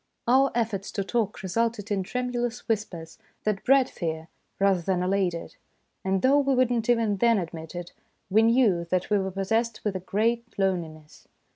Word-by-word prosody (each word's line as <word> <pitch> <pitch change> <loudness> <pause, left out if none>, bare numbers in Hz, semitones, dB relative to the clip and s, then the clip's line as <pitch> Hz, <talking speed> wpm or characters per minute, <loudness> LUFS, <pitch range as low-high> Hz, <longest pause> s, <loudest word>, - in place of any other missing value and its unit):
Our 265 +3 +5
efforts 220 -4 -1
to 200 - -1
talk 210 -1 -2
resulted 215 +2 -1
in 200 -2 +1
tremu 250 +6 -3
lous 240 -1 -3
whispers 185 -7 -3 0.2
that 210 -2 -1
bred 270 -1 +5
fear 160 -1 -5 0.3
rather 195 -2 +3
than 180 +1 0
allayed 185 -2 +1
it, 170 - -8 0.5
and 190 0 0
though 275 +3 +5
we 275 -1 +2
would 255 -1 +3
not 235 -1 -1
even 225 -4 +2
then 230 +2 +4
admit 165 -2 -6
it, 175 0 -7 0.3
we 210 +3 +4
knew 225 -6 +3
that 185 +3 -1
we 205 - +4
were 190 0 -2
pos 190 0 -4
sessed 225 -1 0
with 210 -3 -1
a - - -1
great 230 +5 -1
loneliness. 165 -6 -3
200 Hz, 185 wpm, -26 LUFS, 185-235 Hz, 0.5 s, Our